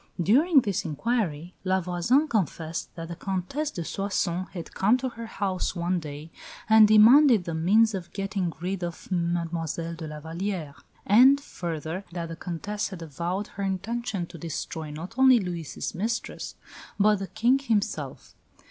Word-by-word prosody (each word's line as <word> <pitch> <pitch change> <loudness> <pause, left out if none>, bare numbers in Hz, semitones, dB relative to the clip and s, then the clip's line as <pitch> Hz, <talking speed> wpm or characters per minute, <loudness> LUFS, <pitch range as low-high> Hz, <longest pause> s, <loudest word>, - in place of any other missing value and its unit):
During 275 - +5
this 200 -6 -1
inquiry 170 - -2
La 190 0 +2
Voisin 185 - +2
confessed 165 - -2
that 165 -1 -6
the 170 - -5
Comtesse 195 - -2
de 170 - -5
Soissons 185 -2 -1
had 170 -4 -8
come 210 +6 +3
to 260 0 -3
her 230 -1 -8
house 195 -4 -2
one 175 +1 0
day 150 0 -8 0.4
"and 220 -1 +8
demanded 225 +2 +7
the 170 - -4
means 210 +8 +4
of 180 -3 -5
getting 195 -3 -2
rid 180 +1 -3
of 170 +2 -6
Mile 170 -1 0
de 165 0 -4
la 150 0 -7
Vallière"; 165 -1 -4 0.3
and, 255 +7 +7
further, 170 - -5
that 170 -2 -4
the 165 - -5
Comtesse 180 +5 -4
had 185 -4 -8
avowed 170 +6 -3
her 200 - -6
intention 195 0 -2
to 170 - -12
destroy 160 0 -5
not 160 +8 -7
only 260 -2 +7
Louis' 175 -6 -4
mistress, 225 +6 -3 0.4
but 210 +1 +5
the 195 0 -5
King 250 +7 +2
himself. 205 - -2
185 Hz, 155 wpm, -26 LUFS, 170-215 Hz, 0.4 s, and